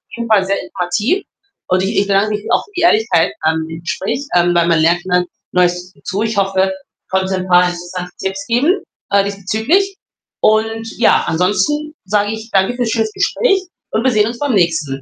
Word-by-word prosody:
jeden 235 Hz, 0 st, -4 dB
Fall 200 Hz, -3 st, +4 dB
sehr 195 Hz, +1 st, -1 dB
informativ 205 Hz, -, -1 dB, 0.4 s
und 185 Hz, 0 st, +2 dB
ich 195 Hz, -, -1 dB
ich 200 Hz, -, +1 dB
bedanke 200 Hz, +2 st, +2 dB
mich 210 Hz, +1 st, -7 dB
auch -, -, +2 dB
für 415 Hz, -, -24 dB
die -, -, 0 dB
Ehrlichkeit 220 Hz, -, +3 dB
an 160 Hz, 0 st, 0 dB
dem 165 Hz, +1 st, -8 dB
Gespräch, 215 Hz, -, -3 dB
ähm, 175 Hz, 0 st, +4 dB
weil 170 Hz, 0 st, +3 dB
man 165 Hz, -1 st, +3 dB
lernt 170 Hz, +2 st, +2 dB
immer 180 Hz, -1 st, +2 dB, 0.3 s
Neues 180 Hz, 0 st, +1 dB
dazu. 200 Hz, +3 st, -4 dB
Ich 220 Hz, -2 st, -1 dB
hoffe, 190 Hz, -1 st, +2 dB
ich 190 Hz, 0 st, -14 dB
konnte 190 Hz, 0 st, 0 dB
'n 185 Hz, 0 st, -4 dB
paar 180 Hz, 0 st, +6 dB
interessante 180 Hz, 0 st, -5 dB
Tipps 195 Hz, +10 st, -3 dB
geben, 285 Hz, -, +2 dB, 0.3 s
äh, 200 Hz, 0 st, +4 dB
diesbezüglich. 220 Hz, -, 0 dB, 0.5 s
Und, 225 Hz, +1 st, +2 dB
ja, 235 Hz, -, +4 dB
ansonsten 205 Hz, -, 0 dB
sage 205 Hz, +1 st, +1 dB
ich 220 Hz, +1 st, -8 dB
danke 195 Hz, +5 st, +2 dB
für's 245 Hz, -2 st, -1 dB
schönes 220 Hz, -1 st, 0 dB
Gespräch 395 Hz, -6 st, +1 dB, 0.3 s
und 220 Hz, -, 0 dB
wir 260 Hz, -, +3 dB
sehen 210 Hz, -1 st, +3 dB
uns 235 Hz, +1 st, -5 dB
beim 285 Hz, -4 st, 0 dB
nächsten. 155 Hz, -7 st, 0 dB
200 Hz, 195 wpm, -16 LUFS, 180-225 Hz, 0.5 s, paar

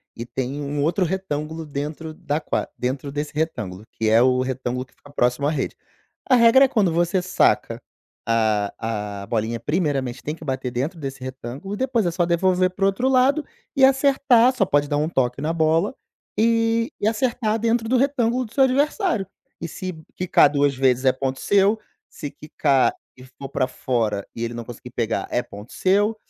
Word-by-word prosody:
E 115 Hz, -, -6 dB
tem 135 Hz, +3 st, -4 dB
um 145 Hz, 0 st, -2 dB
outro 175 Hz, +4 st, +1 dB
retângulo 160 Hz, -3 st, -3 dB
dentro 150 Hz, +2 st, -5 dB
da 155 Hz, -3 st, -2 dB
qua -, -, -2 dB
dentro 130 Hz, +3 st, -3 dB
desse 145 Hz, +1 st, -4 dB
retângulo, 110 Hz, -, -3 dB
que 110 Hz, -1 st, -1 dB
é 115 Hz, +2 st, +5 dB
o 130 Hz, 0 st, +3 dB
retângulo 130 Hz, -1 st, -3 dB
que 125 Hz, -, -30 dB
fica 145 Hz, -, -18 dB
próximo 125 Hz, +2 st, +1 dB
à -, -, +1 dB
rede. 150 Hz, -4 st, -2 dB, 0.5 s
A 255 Hz, -, +7 dB
regra 235 Hz, +3 st, +7 dB
é -, -, +2 dB
quando 215 Hz, -9 st, +2 dB
você 175 Hz, +2 st, +1 dB
saca 180 Hz, -, +1 dB, 0.5 s
a 105 Hz, -2 st, -1 dB
a -, -, -10 dB
bolinha 115 Hz, 0 st, -1 dB
primeiramente 140 Hz, -4 st, -1 dB
tem 150 Hz, +2 st, -4 dB
que 165 Hz, -, -13 dB
bater 130 Hz, -1 st, -2 dB
dentro 145 Hz, +8 st, -3 dB
desse 135 Hz, -2 st, -6 dB
retângulo, 130 Hz, -, -7 dB
e -, -, -8 dB
depois 250 Hz, -4 st, 0 dB
é 175 Hz, -, +1 dB
só 175 Hz, 0 st, +1 dB
devolver 185 Hz, +1 st, +2 dB
para 195 Hz, +1 st, -4 dB
o -, -, +5 dB
outro 195 Hz, +7 st, 0 dB
lado 265 Hz, +4 st, +3 dB, 0.3 s
e 265 Hz, -2 st, +7 dB
acertar, 265 Hz, -2 st, +4 dB
só 200 Hz, -, +2 dB
pode 145 Hz, -4 st, +1 dB
dar 145 Hz, -, +1 dB
um 150 Hz, -, +1 dB
toque 125 Hz, -2 st, 0 dB
na 155 Hz, +2 st, -1 dB
bola, 165 Hz, +8 st, +1 dB, 0.4 s
e 230 Hz, +2 st, +2 dB
e 205 Hz, -, +1 dB
acertar 225 Hz, -1 st, 0 dB
dentro 230 Hz, 0 st, +1 dB
do 255 Hz, -, +1 dB
retângulo 255 Hz, -2 st, +1 dB
do 220 Hz, -, -14 dB
seu 270 Hz, -, +4 dB
adversário. 285 Hz, -, +1 dB, 0.4 s
E 170 Hz, -, -3 dB
se 185 Hz, +2 st, -6 dB, 0.2 s
quicar 175 Hz, -5 st, +4 dB
2 145 Hz, -1 st, +1 dB
vezes 130 Hz, 0 st, +2 dB
é 130 Hz, -, +6 dB
ponto 130 Hz, 0 st, -3 dB
seu, 205 Hz, +2 st, +3 dB, 0.3 s
se 145 Hz, -, -7 dB
quicar 140 Hz, -2 st, +1 dB, 0.3 s
e 125 Hz, -, -12 dB
for 135 Hz, +1 st, -10 dB
pra 130 Hz, -, 0 dB
fora, 115 Hz, -7 st, -2 dB
e 115 Hz, -, -4 dB
ele 115 Hz, 0 st, -3 dB
não 120 Hz, 0 st, -5 dB
conseguir 120 Hz, +1 st, -10 dB
pegar 115 Hz, -2 st, -2 dB
é 120 Hz, -, +1 dB
ponto 105 Hz, 0 st, -12 dB
seu, 205 Hz, +4 st, +2 dB
150 Hz, 195 wpm, -22 LUFS, 130-210 Hz, 0.5 s, A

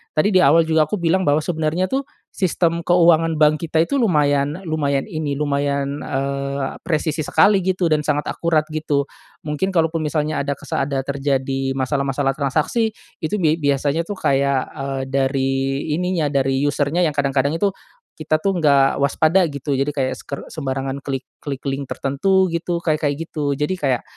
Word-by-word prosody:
tadi 155 Hz, +7 st, +3 dB
di -, -, +7 dB
awal 165 Hz, +3 st, +6 dB
juga 160 Hz, -1 st, +3 dB
aku 210 Hz, -, -1 dB
bilang 175 Hz, +2 st, +1 dB
bahwa 145 Hz, +1 st, +3 dB
sebenernya 160 Hz, +2 st, -1 dB
tuh, 270 Hz, +7 st, -1 dB, 0.3 s
sistem 170 Hz, -3 st, 0 dB
keuangan 165 Hz, -2 st, +4 dB
bank 155 Hz, 0 st, +3 dB
kita 165 Hz, 0 st, +1 dB
itu 280 Hz, -, -2 dB
lumayan 150 Hz, -, +2 dB
lumayan 145 Hz, -4 st, 0 dB
ini, 155 Hz, -2 st, -3 dB
lumayan, 140 Hz, -1 st, -1 dB
eee, 140 Hz, 0 st, -3 dB
presisi 155 Hz, -1 st, -1 dB
sekali 190 Hz, +7 st, +4 dB
gitu 185 Hz, -1 st, 0 dB
dan 155 Hz, -1 st, +3 dB
sangat 150 Hz, -1 st, 0 dB
akurat 160 Hz, -2 st, 0 dB
gitu. 145 Hz, -2 st, 0 dB, 0.4 s
Mungkin 150 Hz, +6 st, -1 dB
kalaupun 165 Hz, -1 st, +1 dB
misalnya 150 Hz, 0 st, -1 dB
ada 140 Hz, 0 st, -1 dB
kesa -, -, -3 dB
ada 135 Hz, -1 st, -1 dB
terjadi 135 Hz, -1 st, -1 dB
masalah-masalah 135 Hz, 0 st, 0 dB
transaksi 155 Hz, -, 0 dB, 0.3 s
itu 210 Hz, +7 st, -1 dB
bia 155 Hz, -2 st, +3 dB
biasanya 145 Hz, +1 st, +1 dB
tuh 205 Hz, +3 st, -6 dB
kayak, 140 Hz, -3 st, +2 dB
eee, 135 Hz, -2 st, -3 dB
dari 135 Hz, 0 st, +1 dB, 0.4 s
ininya 180 Hz, -2 st, 0 dB
dari 135 Hz, -1 st, +1 dB
user-nya 145 Hz, +4 st, +1 dB
yang 155 Hz, -, 0 dB
kadang-kadang 140 Hz, 0 st, +1 dB
itu 200 Hz, +4 st, +2 dB, 0.5 s
kita 155 Hz, 0 st, 0 dB
tuh 195 Hz, -, +2 dB
nggak 140 Hz, -3 st, +3 dB
waspada 155 Hz, +6 st, +3 dB
gitu 140 Hz, 0 st, -5 dB
jadi 140 Hz, +2 st, +1 dB
kayak 130 Hz, -2 st, 0 dB
seker 140 Hz, -, -6 dB
sembarangan 135 Hz, -2 st, -3 dB
klik 135 Hz, -1 st, -4 dB, 0.2 s
klik 140 Hz, -2 st, -6 dB
link 135 Hz, -1 st, -3 dB
tertentu 190 Hz, +7 st, +1 dB
gitu 170 Hz, +1 st, -2 dB
kayak-kayak 150 Hz, -3 st, 0 dB
gitu. 145 Hz, -3 st, -1 dB
Jadi 150 Hz, +6 st, -1 dB
kayak 135 Hz, -5 st, 0 dB
150 Hz, 165 wpm, -20 LUFS, 140-165 Hz, 0.5 s, di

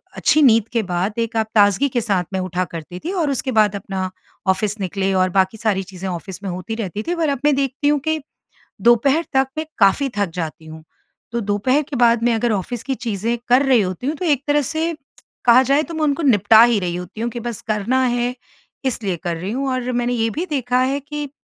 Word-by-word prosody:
अच्छी 310 Hz, -, +3 dB
नींद 230 Hz, -6 st, +5 dB
के 230 Hz, -2 st, +1 dB
बाद 180 Hz, +2 st, -2 dB
एक 230 Hz, 0 st, -2 dB
आप 220 Hz, -1 st, +1 dB
ताज़गी 205 Hz, +6 st, +4 dB
के 245 Hz, -2 st, -1 dB
साथ 200 Hz, -5 st, 0 dB
में 190 Hz, -, 0 dB
उठा 185 Hz, 0 st, -2 dB
करती 165 Hz, +2 st, -7 dB
थीं 360 Hz, -, -2 dB
और 335 Hz, -6 st, 0 dB
उसके 265 Hz, 0 st, -2 dB
बाद 215 Hz, -3 st, +3 dB
अपना 190 Hz, -1 st, -4 dB, 0.4 s
ऑफिस 200 Hz, +3 st, 0 dB
निकले 195 Hz, 0 st, -1 dB
और 185 Hz, 0 st, +2 dB
बाकी 190 Hz, +3 st, +1 dB
सारी 210 Hz, -3 st, 0 dB
चीजें 190 Hz, 0 st, -8 dB
ऑफिस 185 Hz, +2 st, -6 dB
में 195 Hz, -, -3 dB
होती 185 Hz, +5 st, -5 dB
रहती 210 Hz, -2 st, -4 dB
थी 350 Hz, -, 0 dB
पर 325 Hz, -3 st, 0 dB
अब 280 Hz, -2 st, -1 dB
मैं 295 Hz, -1 st, +4 dB
देखती 275 Hz, +1 st, -1 dB
हूँ 295 Hz, 0 st, +3 dB
कि, 315 Hz, +2 st, -1 dB, 0.6 s
दोपहर 270 Hz, +7 st, +4 dB
तक 265 Hz, 0 st, +3 dB
मैं 315 Hz, -, -2 dB
काफ़ी 210 Hz, +7 st, +4 dB
थक 200 Hz, -3 st, +1 dB
जाती 160 Hz, -2 st, -5 dB
हूँ। 160 Hz, 0 st, -11 dB, 0.5 s
तो 235 Hz, -, -1 dB
दोपहर 210 Hz, +7 st, +1 dB
के 290 Hz, -, -4 dB
बाद 235 Hz, -2 st, +3 dB
मैं 240 Hz, 0 st, +3 dB
अगर 230 Hz, +1 st, 0 dB
ऑफिस 215 Hz, +4 st, -3 dB
की 270 Hz, 0 st, -2 dB
चीज़ें 230 Hz, 0 st, -2 dB
कर 250 Hz, +3 st, +5 dB
रही 260 Hz, -4 st, +4 dB
होती 185 Hz, +6 st, -3 dB
हूँ, 300 Hz, -, -1 dB
तो 360 Hz, -, -4 dB
एक 290 Hz, -4 st, +1 dB
तरह 295 Hz, 0 st, +3 dB
से 320 Hz, +4 st, -1 dB, 0.5 s
कहा 245 Hz, +2 st, +7 dB
जाए 275 Hz, +3 st, +2 dB
तो 335 Hz, -, -8 dB
मैं 315 Hz, -1 st, -2 dB
उनको 300 Hz, +2 st, 0 dB
निपटा 220 Hz, -4 st, +6 dB
ही 235 Hz, -3 st, +3 dB
रही 175 Hz, -2 st, -2 dB
होती 180 Hz, +5 st, -7 dB
हूँ, 235 Hz, -, -1 dB
कि 240 Hz, -, -6 dB
बस 235 Hz, -2 st, -5 dB
करना 220 Hz, +5 st, +1 dB
है 245 Hz, 0 st, 0 dB, 0.5 s
इसलिए 210 Hz, -8 st, -1 dB
कर 175 Hz, -2 st, -2 dB
रही 185 Hz, +5 st, -4 dB
हूँ 270 Hz, +3 st, -2 dB
और 255 Hz, -1 st, -2 dB
मैंने 245 Hz, 0 st, 0 dB
ये 225 Hz, -1 st, +1 dB
भी 320 Hz, -, -3 dB
देखा 255 Hz, -6 st, 0 dB
है 270 Hz, +2 st, 0 dB
कि, 295 Hz, 0 st, -6 dB
235 Hz, 230 wpm, -20 LUFS, 195-270 Hz, 0.6 s, कहा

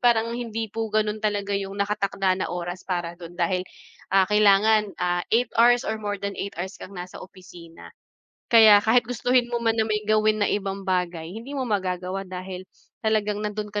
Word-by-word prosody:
parang 230 Hz, -1 st, +3 dB
hindi 225 Hz, -2 st, -4 dB
po 225 Hz, 0 st, -2 dB
gano'n 215 Hz, 0 st, 0 dB
talaga 205 Hz, -1 st, -1 dB
'yong 195 Hz, 0 st, -2 dB
naka-takda 200 Hz, -2 st, 0 dB
na -, -, 0 dB
oras 175 Hz, +1 st, -5 dB
para 175 Hz, -2 st, -2 dB
do'n 175 Hz, 0 st, -10 dB
dahil, 180 Hz, +1 st, 0 dB, 0.5 s
ah, 190 Hz, -1 st, +6 dB
kailangan, 210 Hz, +1 st, +4 dB
ah, 175 Hz, 0 st, 0 dB
8 245 Hz, +2 st, +2 dB
hours 245 Hz, +1 st, +5 dB
or 220 Hz, 0 st, -2 dB
more 205 Hz, -1 st, -3 dB
than 200 Hz, 0 st, -4 dB
8 200 Hz, -, -5 dB
hours 190 Hz, +3 st, -5 dB
kang 195 Hz, -, -10 dB
nasa 180 Hz, +1 st, -8 dB
opisina. 175 Hz, -3 st, -13 dB, 0.6 s
Kaya 220 Hz, -3 st, +8 dB
kahit 225 Hz, +1 st, +3 dB
gustuhin 245 Hz, 0 st, +1 dB
mo 240 Hz, -1 st, -3 dB
man 225 Hz, 0 st, +1 dB
na 220 Hz, -, +2 dB
may 215 Hz, -1 st, -1 dB
gawin 215 Hz, 0 st, +2 dB
na -, -, +2 dB
ibang 195 Hz, -1 st, -2 dB
bagay, 180 Hz, -3 st, -2 dB
hindi 230 Hz, +8 st, -8 dB
mo 270 Hz, -, -1 dB
magagawa 190 Hz, -2 st, -2 dB
dahil, 185 Hz, 0 st, -7 dB, 0.3 s
talagang 210 Hz, -2 st, 0 dB
nandoon 210 Hz, 0 st, -4 dB
ka 205 Hz, -, -2 dB
205 Hz, 185 wpm, -24 LUFS, 185-220 Hz, 0.6 s, Kaya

